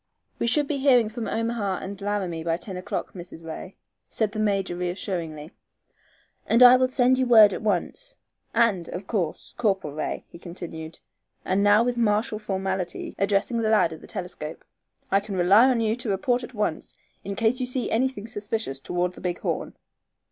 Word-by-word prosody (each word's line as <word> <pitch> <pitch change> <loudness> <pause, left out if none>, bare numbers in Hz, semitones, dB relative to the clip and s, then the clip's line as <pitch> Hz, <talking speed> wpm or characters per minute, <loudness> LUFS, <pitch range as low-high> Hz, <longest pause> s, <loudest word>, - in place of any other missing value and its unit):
"We - - 0
should 290 +4 +3
be 280 -2 -2
hearing 250 -5 +4
from 225 +1 -5
Omaha 225 -4 -1
and 200 +1 -7
Laramie 195 -5 -2
by 165 0 0
ten 185 +2 -7
o'clock, 180 - -4
Mrs. 175 -2 -10
Ray," 165 +4 -7 0.3
said 215 -2 -1
the 215 - -5
major, 195 -4 0
reassuringly, 175 -3 -4 1.0
"and 235 +2 +6
I 250 0 +10
will 255 0 +3
send 255 0 +3
you 260 - +2
word 220 -4 +8
at - - -4
once. 220 - -2 0.4
And, 200 -8 +2
of 185 +2 -6
course, 185 -7 -3
Corporal 195 -10 0
Ray," 155 - -4
he 170 - -13
continued, 165 -2 -7 0.5
and 190 +2 +1
now 205 +2 +5
with 245 0 -1
martial 215 +1 +1
formality 190 -3 -3
addressing 200 +4 +1
the 220 -1 +1
lad 205 -7 +3
at 160 - -11
the - - -13
telescope, 175 -5 -6 0.5
"I 195 - +5
can 200 -1 -6
rely 195 +7 +6
upon 255 -3 +3
you 220 0 +1
to 245 -2 -4
report 240 +6 +1
at 245 - -9
once 210 -7 -3 0.3
in 200 0 -4
case 230 +5 +1
you 255 - -1
see 250 0 -2
anything 245 -2 0
suspicious 205 -10 -3
toward 180 +4 -1
the - - -12
Big 180 -1 -2
Horn." - - -3
205 Hz, 185 wpm, -25 LUFS, 180-235 Hz, 1.0 s, I